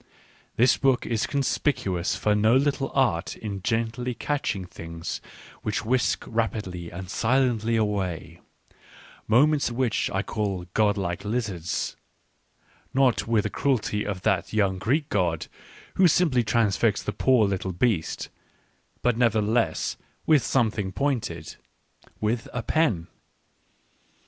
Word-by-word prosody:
This 125 +2 +4
book 135 -3 +2
is 115 -3 0
conspicuous 125 - 0
for 105 - +1
no 110 +3 +4
little 135 0 +1
art 95 -11 +1
in 100 -3 -5
gently 115 +3 -1
catching 135 -11 -2
things 80 -1 -6 0.4
which 105 0 -2
whisk 125 +2 +1
rapidly 105 -7 -2
and 90 +2 -7
silently 115 +2 +1
away, 95 -6 -2 0.9
moments 140 +6 +4
which 120 -2 0
1 95 +1 -1
call 100 -6 -2
godlike 100 -4 +1
lizards 105 -7 -2 0.5
— - - -43 0.3
not 130 -5 +3
with 115 -3 +2
the - - -3
cruelty 105 -6 0
of 100 -2 -4
that - - +1
young 100 -3 +1
Greek 140 - +1
god 85 -5 0 0.5
who 185 - +6
simply 150 -7 +3
transfixed 110 -1 +1
the 105 - -2
poor 120 0 +3
little 95 -1 -2
beast; 90 -2 -1 0.7
but 125 -1 +3
nevertheless 115 -1 +1 0.3
with 155 -4 +5
something 110 -7 0
pointed 110 - -2 0.3
— - - -30
with 110 +2 -1
a 125 - -3
pen. 115 - +1
110 Hz, 125 wpm, -26 LUFS, 95-125 Hz, 0.9 s, who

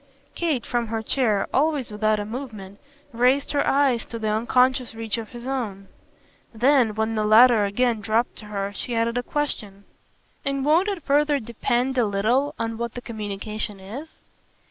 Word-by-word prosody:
Kate, 315 -8 -1
from 240 -1 -1
her 225 0 -3
chair, 220 -6 +1
always 285 -4 +1
without 215 0 +1
a 205 - -3
movement, 215 -5 -7 0.3
raised 255 +4 +2
her 285 -1 +1
eyes 270 -4 +3
to 230 - -7
the 220 -1 -3
unconscious 250 +2 +2
reach 225 -1 -2
of 220 - -7
his 240 -1 -10
own. 220 -8 -4 0.6
Then 240 -1 +3
when 220 +1 0
the 215 -1 0
latter 220 0 +6
again 225 +2 0
dropped 225 +3 0
to 215 - -10
her 200 -1 -4
she 235 +4 -4
added 230 +1 0
a 245 - +1
question. 215 -8 -3 0.6
"And 275 -1 -1
won't 330 +6 +4
it 390 -6 -3
further 290 +1 +2
depend 240 +2 -1
a 240 - +3
little 240 +9 +1
on 225 0 -3
what 235 -1 -4
the 245 - -5
communication 210 -2 -5
is?" 240 +12 -9
235 Hz, 170 wpm, -24 LUFS, 215-265 Hz, 0.6 s, latter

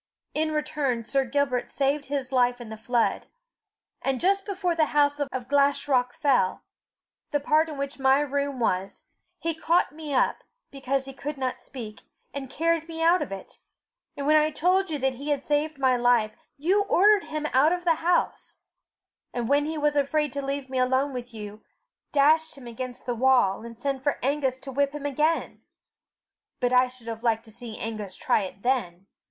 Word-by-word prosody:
In 310 0 0
return 300 -6 -1
Sir 270 +3 +1
Gilbert 260 -1 0
saved 280 +1 0
his 275 -2 -3
life 245 -1 +2
in 240 -2 -9
the 220 - -6
flood. 230 +2 0 0.7
And 270 -2 -1
just 390 +3 +1
before 375 -3 -1
the 325 -2 +3
house 290 0 +3
of 260 -3 -3
Glashruach 280 -2 +2
fell 250 -10 +1 0.7
the 290 - 0
part 310 +3 +2
in 300 - -7
which 280 0 -4
my 265 +1 +4
room 280 -1 -2
was, 195 -4 -1 0.3
he 330 -1 -2
caught 325 0 +1
me 305 0 -8
up, 265 - +1 0.3
because 275 0 -2
he 270 - -8
could 290 +2 -5
not 255 -1 -2
speak, 230 -5 -9 0.3
and 270 -1 -6
carried 330 +2 0
me 325 -1 -4
out 345 +2 +4
of - - -4
it; 195 -1 -8 0.6
and 280 - -3
when 305 +1 +5
I 305 0 +3
told 365 +5 +1
you 305 - -1
that 265 -1 0
he 280 +4 -7
had 285 -2 -1
saved 300 +1 0
my 260 -2 +3
life, 240 -3 +3 0.3
you 365 +8 +2
ordered 410 +1 +4
him 305 -1 -4
out 275 +5 +5
of 355 0 -1
the 335 -3 +3
house, 345 +1 0 0.7
and 240 -2 -3
when 285 +2 +3
he 315 0 -3
was 295 0 +1
afraid 290 0 +1
to 280 - -2
leave 275 0 -3
me 260 -1 -2
alone 260 +2 +1
with 245 -1 -6
you, 210 -1 -9 0.5
dashed 310 +2 +3
him 265 - -12
against 245 +1 -7
the 245 - -1
wall, 240 -5 +3
and 230 0 -9
sent 270 +2 -2
for 285 +1 0
Angus 270 -1 0
to 270 - -7
whip 280 +1 +1
him 290 -1 -6
again. 305 +4 0 1.0
But 250 -1 +1
I 250 0 +5
should 250 -2 -14
have 225 -1 -5
liked 225 -1 +1
to 220 - -14
see 230 -1 -8
Angus 215 -4 -5
try - - +1
it 195 0 -7
then!" 195 -8 -1
275 Hz, 190 wpm, -26 LUFS, 245-300 Hz, 1.0 s, when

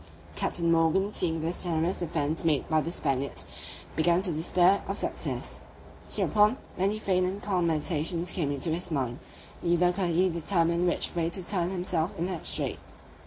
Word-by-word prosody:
Captain 170 -1 0
Morgan 165 +5 +3
seeing 165 -2 0
this 165 +2 -2
generous 170 +1 0
defence 160 -2 -1
made 155 -5 +1
by 155 -1 +2
the 165 - -3
Spaniards, 140 -4 -1 0.5
began 170 +3 +3
to 185 - 0
despair 175 +4 +3
of - - -2
success. - - -3 0.5
Hereupon, 210 +4 +3 0.2
many 195 +3 +1
faint 185 -3 +1
and 190 +2 -3
calm 185 -4 0
meditations 165 +2 -1
came 155 -7 -1
into 145 +3 -2
his 175 +3 -2
mind; 130 -5 -2 0.4
neither 175 +1 +3
could 180 -1 -1
he 175 +3 +3
determine 170 0 +1
which 175 - 0
way 170 -1 0
to 180 +1 -4
turn 180 -3 0
himself 180 -3 -1
in 170 - -1
that 180 -3 -2
strait. - - +1
170 Hz, 165 wpm, -28 LUFS, 160-185 Hz, 0.5 s, Morgan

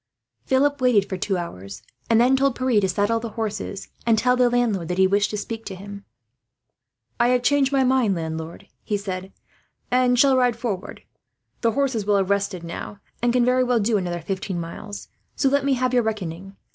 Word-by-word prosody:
Philip 285 +1 +2
waited 225 -6 +3
for 190 - -3
two 190 +1 -1
hours, 100 - -7 0.3
and 230 -1 +4
then 250 +3 +5
told 270 -1 +2
Pierre 255 -5 +2
to 190 - +1
saddle 205 +5 +1
the 230 0 -5
horses, 210 -2 -4
and 230 -1 +3
tell 250 +3 +3
the 250 -1 +3
landlord 230 -8 0
that 180 - -3
he 190 - +5
wished 200 +2 +2
to 210 - -3
speak 225 +2 -5
to 195 - -6
him. 200 +1 -10 1.1
"I 240 - +4
have 250 0 +2
changed 285 0 +3
my 270 -1 +3
mind, 255 -6 +2
landlord," 160 0 -6
he 210 - -2
said, 190 -1 -5 0.6
"and 250 0 +3
shall 270 +2 +5
ride 250 -2 +3
forward. 220 -6 -5 0.6
The 230 -2 +2
horses 255 -6 0
will 205 -1 +4
have 195 0 0
rested 200 -3 -1
now, 170 +4 -7 0.2
and 240 0 +2
can 245 0 +3
very 255 +1 +3
well 245 -2 +2
do 215 +1 +1
another 175 -3 -3
fifteen 185 +1 -3
miles; 185 +5 -7 0.3
so 275 - +2
let 280 +1 +2
me 275 -1 +2
have 255 0 0
your 245 - +4
reckoning. 195 -4 -4
220 Hz, 200 wpm, -23 LUFS, 195-250 Hz, 1.1 s, then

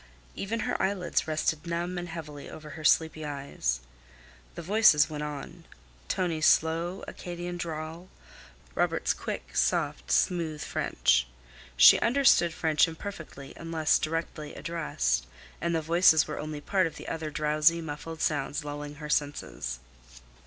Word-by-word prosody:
Even 220 +3 -3
her - - -1
eyelids 190 -4 0
rested 155 +1 -1
numb 175 +2 -2
and 175 0 -6
heavily 150 -3 -8
over 155 -1 -10
her 155 - -9
sleepy 160 0 +3
eyes. 140 - -3 0.7
The - - -6
voices 170 -6 +5
went 150 -1 -4
on—Tonie's 150 - -3
slow, 165 +4 +2
Acadian 175 0 -6
drawl, 165 +1 -6 0.6
Robert's - - +1
quick, - - -6
soft, - - 0
smooth 165 -5 +1
French. - - +1 0.5
She - - +9
understood 240 -8 +4
French 160 0 +3
imperfectly 165 -5 -8
unless 165 -2 +1
directly 155 -1 -4
addressed, 65 - -1 0.3
and 170 0 0
the 160 - 0
voices 165 -1 +5
were 150 - -5
only 150 -1 -5
part 185 +2 +2
of 160 - -9
the - - -9
other 160 -1 -3
drowsy, 155 +2 +2
muffled 160 +1 -6
sounds 145 0 -1
lulling 145 0 -6
her 150 +1 -7
senses. 65 - -2
160 Hz, 130 wpm, -28 LUFS, 150-170 Hz, 0.7 s, She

